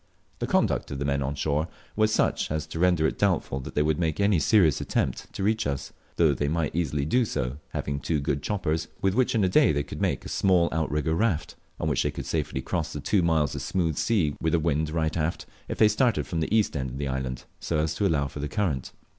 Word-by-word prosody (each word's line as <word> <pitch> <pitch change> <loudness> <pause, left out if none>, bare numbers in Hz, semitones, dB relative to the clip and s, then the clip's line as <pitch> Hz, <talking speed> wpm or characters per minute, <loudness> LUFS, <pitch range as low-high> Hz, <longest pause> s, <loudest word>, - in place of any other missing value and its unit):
The - - -2
conduct - - +1
of 70 - -4
the 70 - -2
men 70 0 0
on 70 +2 -2
shore 75 +2 0 0.3
was 110 0 +3
such - - +1
as 75 0 -2
to 80 +1 -6
render 90 -3 +3
it - - -1
doubtful 65 - +1
if - - -8
they 75 - +3
would 75 +1 +1
make 80 -1 0
any 100 -3 +3
serious 85 - +4
attempt - - -2
to - - -4
reach 110 -3 +1
us, 70 -2 -4 0.2
though 80 -4 +4
they 70 +2 -1
might 80 0 -1
easily 75 -4 0
do 125 +11 +3
so, 65 - -2
having 70 0 -3
two 75 +2 -1
good 70 0 -1
choppers, 80 -5 -1
with 95 -1 +1
which 125 +2 +2
in 110 - +3
a - - +4
day 90 - +4
they 70 -1 0
could - - -8
male - - +1
a - - -4
small 90 -3 +3
outrigger 80 -1 0
raft 90 -2 0 0.3
on - - -1
which - - +1
they - - +1
could - - -6
safely 65 - -2
cross - - -2
the 75 - -4
two 95 +6 +2
miles 80 -4 +2
of - - -4
smooth 85 -5 0
sea 95 -10 +1
with 80 - 0
the 85 - +4
wind 80 -1 0
right 80 0 -1
aft, 80 0 -1 0.2
if - - -4
they 110 - +6
started 115 +3 +2
from 85 - -3
the 80 - -2
east 110 -6 +2
end 65 -2 -2
of 65 - -7
the 70 0 -2
island, 65 -1 -3 0.2
so 80 - -1
as 75 0 0
to 100 +5 +1
allow 70 -5 +1
for 70 - -8
the 75 0 -3
current. 75 -8 -2
80 Hz, 250 wpm, -26 LUFS, 70-90 Hz, 0.3 s, they